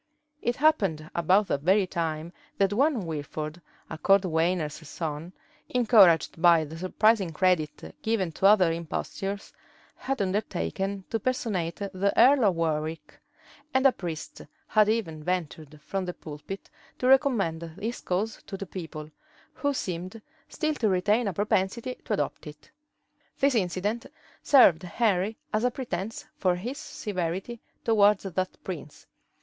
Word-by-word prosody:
[*] 300 0 -47
It 240 - 0
happened 195 - +1
about 185 +5 +3
that 140 - 0
very 190 +5 +3
time 165 -2 -3 0.2
that 195 0 +2
one 260 - +2
Wilford, 155 +1 -5 0.3
a 160 - -7
cordwainer's 170 -5 +1
son, 160 +1 -5 0.4
encouraged 200 - +5
by 170 -2 +6
the 155 +2 -9
surprising 195 +3 +2
credit 165 -2 0
given 215 -6 0
to 190 +5 +3
other 195 -5 +5
impostures, 195 +4 -4 0.4
had 270 +1 -3
undertaken 195 - -2
to 225 - 0
personate 205 -9 -1
the 200 0 -1
earl 265 -1 +6
of 190 -3 +3
Warwick; 160 -1 -3 0.6
and 260 +1 +3
a 270 - +8
priest 170 -8 -6 0.2
had 215 -1 +3
even 165 -9 -1
ventured 160 -4 -3
from 190 +4 -3
the 180 - -5
pulpit 155 +6 -9 0.3
to - - -3
recommend 250 - +3 0.2
his 225 +4 -4
cause 205 +5 -2
to 195 - -5
the 195 - -5
people, 160 -4 -8 0.4
who 285 - -1
seemed 185 -4 -4 0.3
still 310 -1 -1
to 230 -7 0
retain 205 +5 +2
a 195 - -1
propensity 205 +6 0
to 220 - -1
adopt 195 - -2
it. 150 0 -12 0.7
This 275 0 +3
incident 205 +2 -1 0.3
served 195 - +6
Henry 200 +2 0 0.2
as 215 +1 +1
a 250 - +4
pretence 225 -4 -5
for 185 -2 +2
his 245 +11 -5
severity 195 - -4 0.2
towards 210 -3 +4
that 185 -1 -2
prince. 155 -5 -7
190 Hz, 140 wpm, -27 LUFS, 165-220 Hz, 0.7 s, a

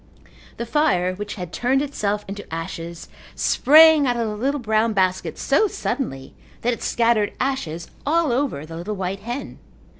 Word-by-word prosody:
The 235 - -3
fire 230 - +1
which 205 +2 -6
had 180 -3 -7
turned 265 +3 +1
itself 210 -7 -2
into 200 -1 -8
ashes 165 +1 -6 0.3
sprang 310 0 +6
out 245 -1 +1
of 230 -1 0
the 210 - -3
little 275 +7 -1
brown 220 -1 +1
basket 185 -2 0
so 435 - +2
suddenly 135 - -4 0.3
that 245 +1 +2
it - - -7
scattered 230 -3 +1
ashes 170 - -2 0.2
all 320 -1 +2
over 245 - -1
the 165 +1 -8
little 200 +5 -4
white 190 0 -3
hen. 240 +6 -6
215 Hz, 160 wpm, -22 LUFS, 185-270 Hz, 0.3 s, sprang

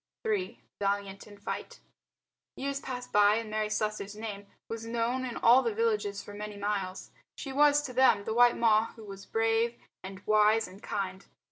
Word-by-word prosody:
III. 415 -4 -1 0.2
VALIANT 200 0 -2
IN 205 -1 -13
FIGHT 200 - -6 0.8
Years 275 +1 -3
passed 250 -2 -6
by 205 0 +5
and 225 -1 -3
Mary 215 0 -1
Slessor's 210 -1 -2
name 210 -2 -6 0.2
was 225 0 -5
known 235 +3 -1
in 245 -2 -5
all 245 +3 +6
the 230 -4 -2
villages 210 -3 0
for 205 - -10
many 210 0 -7
miles. 200 -2 -3 0.3
She 270 - -6
was, 295 +1 +4
to 255 - -6
them, 255 -5 +4
the 220 - -3
white 240 +1 +5
Ma 225 -1 +4
who 225 - -12
was 195 -1 -10
brave 225 +1 +1 0.3
and 190 0 -8
wise 215 +1 +4
and 190 +3 -14
kind. 190 -1 -4
215 Hz, 175 wpm, -30 LUFS, 205-235 Hz, 0.8 s, all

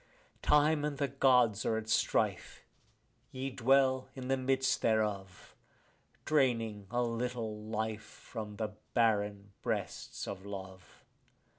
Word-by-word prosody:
Time 150 0 +4
and 150 -2 -2
the 140 0 +1
Gods 125 -6 +4
are 110 - +1
at 110 0 -5
strife; 110 - 0 0.7
ye 130 +1 -4
dwell 130 +1 +3
in 130 -1 -6
the 135 - +4
midst 135 +1 +1
thereof, 105 -4 -1 0.7
Draining 115 -8 +1
a 120 0 +1
little 115 -2 -3
life 110 0 -2
from 110 -1 -8
the 110 0 -2 0.3
barren 105 -3 +1
breasts - - -3
of 95 - -6
love. 95 -2 -9
115 Hz, 120 wpm, -33 LUFS, 105-130 Hz, 0.7 s, Time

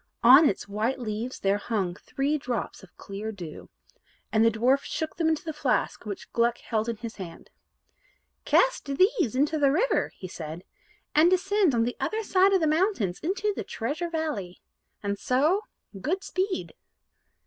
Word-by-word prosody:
On 270 +6 +9
its 195 - -4
white 215 +6 -1
leaves 230 +1 -4
there 200 +1 +2
hung 200 -5 -1
three 280 +9 -2
drops 245 -3 -4
of 190 - -18
clear 205 +2 -6
dew. 175 -7 -9 0.6
And 220 0 +4
the 230 - +6
dwarf 245 +5 +2
shook 315 -1 -4
them 325 -2 +2
into 320 +2 -1
the 315 - -3
flask 275 -6 -1
which 200 - -7
Gluck 235 0 +2
held 220 0 -2
in 230 - -1
his 230 0 -7
hand. 180 -4 -9 0.9
"Cast - - +3
these 330 - +2
into 295 +4 +1
the 280 -2 +4
river," 410 - +1
he 185 - -7
said, 165 -1 -7 0.5
"and 315 +3 +6
descend 375 - +2
on 230 - +3
the 245 +1 -2
other 440 +1 -1
side 385 -1 +4
of 380 -2 +3
the - - +3
mountains 310 - +1
into 400 +5 -1
the - - -3
Treasure 300 +9 -3
Valley. 305 - -3 0.4
And 200 0 -2
so 310 +11 +2 0.4
good 370 - -1
speed." 375 0 -2
265 Hz, 170 wpm, -27 LUFS, 215-335 Hz, 0.9 s, On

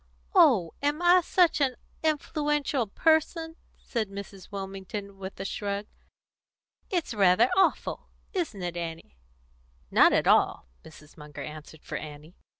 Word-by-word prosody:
"Oh, 260 - +5
am 290 +2 0
I 355 +1 +6
such 345 -3 +3
an 260 -3 +2 0.3
influential 295 -4 0
person?" 325 - +1 0.2
said 220 -5 -3
Mrs. 200 -1 -9
Wilmington, 195 0 -6
with 190 0 -8
a 195 - -4
shrug. 200 +1 -3 1.0
"It's 345 -9 -1
rather 200 +3 +4
awful 385 - +1 0.3
isn't 315 - -3
it, 175 -1 -3
Annie?" 165 - -7 0.7
"Not - - +6
at - - +2
all!" - - +3 0.2
Mrs. 155 -1 -15
Munger 150 -1 -9
answered 155 0 -10
for - - -5
Annie. 150 +3 -11
200 Hz, 130 wpm, -27 LUFS, -, 1.0 s, I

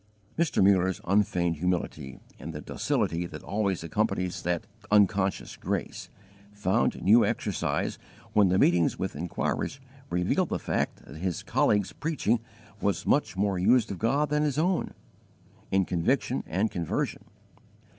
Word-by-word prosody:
Mr. 165 - +2
Mullers 95 -1 +3
unfeigned 90 -4 +1
humility, 80 -5 -2 0.2
and 80 +5 -7
the 75 - -5
docility 85 +2 -1
that - - -9
always 100 -4 -1
accompanies 90 0 -1
that 85 -1 -1 0.2
unconscious 100 -2 +2
grace, - - -4 0.4
found 105 +2 +1
new 110 +4 +6
exercise 105 -2 -1 0.3
when 105 -3 +5
the 95 - +3
meetings 85 -3 +3
with - - -3
inquirers 90 - -2 0.3
revealed 90 0 +1
the - - -1
fact - - -2
that 75 - -11
his 90 +1 -3
colleague's 105 -2 +1
preaching 145 -7 0 0.4
was - - 0
much 95 - +1
more 100 -2 +1
used 115 +4 +3
of 95 - -5
God 140 +7 +1
than 150 0 +1
his 150 -2 0
own, 175 +3 0 0.7
in 95 -1 +2
conviction 85 -2 0
and 100 +6 0
conversion. 85 -4 -2
95 Hz, 135 wpm, -28 LUFS, 90-110 Hz, 0.7 s, new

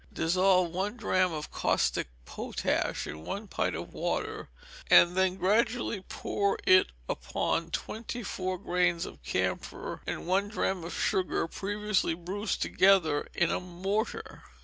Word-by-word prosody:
Dissolve 180 +1 +3
one 195 +6 -2
drachm 185 -5 +2
of 155 -1 -5
caustic - - +1 0.2
potash - - -2
in 75 - -7
one 205 - -5
pint - - -1
of - - -6
water, - - -3 0.4
and 175 +1 +7
then 190 -1 +2
gradually 220 +3 +1
pour 200 +1 -1
it 185 0 +6 0.2
upon 165 0 -1
twenty 225 +6 -4
four 185 -2 -3
grains 175 -1 +1
of - - -10
camphor 65 +1 -3
and - - -3
one 190 +3 +2
drachm 190 -4 -1
of 170 - -6
sugar, 185 -3 0
previously 205 -1 -1
bruised 190 +4 -2
together 185 -6 +3
in 175 - +2
a - - 0
mortar. 190 +5 -3
185 Hz, 135 wpm, -29 LUFS, 175-200 Hz, 0.4 s, and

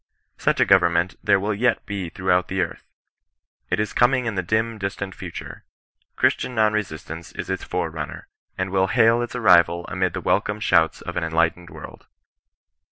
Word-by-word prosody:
Such - - +1
a - - +5
government 85 +2 +3
there 100 - +4
will 105 +2 -1
yet 120 +4 +1
he 100 -4 -4
throughout 90 0 0
the 95 0 -1
earth. - - -5 0.8
It 90 - 0
is 105 -1 -2
coming 125 +1 +3
in 115 - -1
the 95 - -1
dim 110 +4 -1
distant 100 -1 -4
future. - - -8 0.5
Christian 125 - +1
non 110 -1 +3
resistance 85 -5 -5
is - - -5
its 95 - -3
forerunner, - - -4 0.3
and 95 0 -2
will 95 0 +2
hail 115 +2 +4
its 120 0 -5
arrival 85 -6 +4
amid 95 -2 -1
the - - -3
welcome 105 - 0
shouts 85 -6 +2
of - - -6
an 90 - 0
enlightened 85 +1 0
world. - - -12
95 Hz, 170 wpm, -23 LUFS, 85-110 Hz, 0.8 s, a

